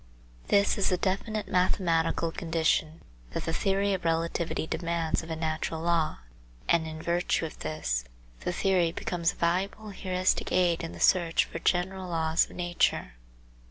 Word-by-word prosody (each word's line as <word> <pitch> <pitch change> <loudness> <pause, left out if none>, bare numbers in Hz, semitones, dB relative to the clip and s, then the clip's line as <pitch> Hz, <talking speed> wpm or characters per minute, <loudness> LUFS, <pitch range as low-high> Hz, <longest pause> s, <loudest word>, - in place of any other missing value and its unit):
This 200 0 +3
is 195 - +2
a 180 - +2
definite 205 +3 -1
mathematical 170 -3 +1
condition 160 -1 0 0.3
that - - -3
the 165 - -1
theory 195 +2 +1
of 185 - -3
relativity 165 0 0
demands 170 -1 -1
of 165 - -11
a 160 - -2
natural 160 0 -2
law, 165 - +1 0.5
and 165 -1 +3
in 155 0 -6
virtue 170 0 0
of 155 - -8
this, 65 -6 -2 0.3
the - - -2
theory 180 -2 +2
becomes 170 0 -1
a - - -19
valuable 195 +5 -1
heuristic 185 -1 0
aid 175 -2 +2
in 165 - -5
the - - -10
search 170 -3 +4
for 165 - -7
general 185 +2 0
laws 160 -1 +2
of - - -12
nature. 175 - 0
170 Hz, 160 wpm, -28 LUFS, 165-185 Hz, 0.5 s, search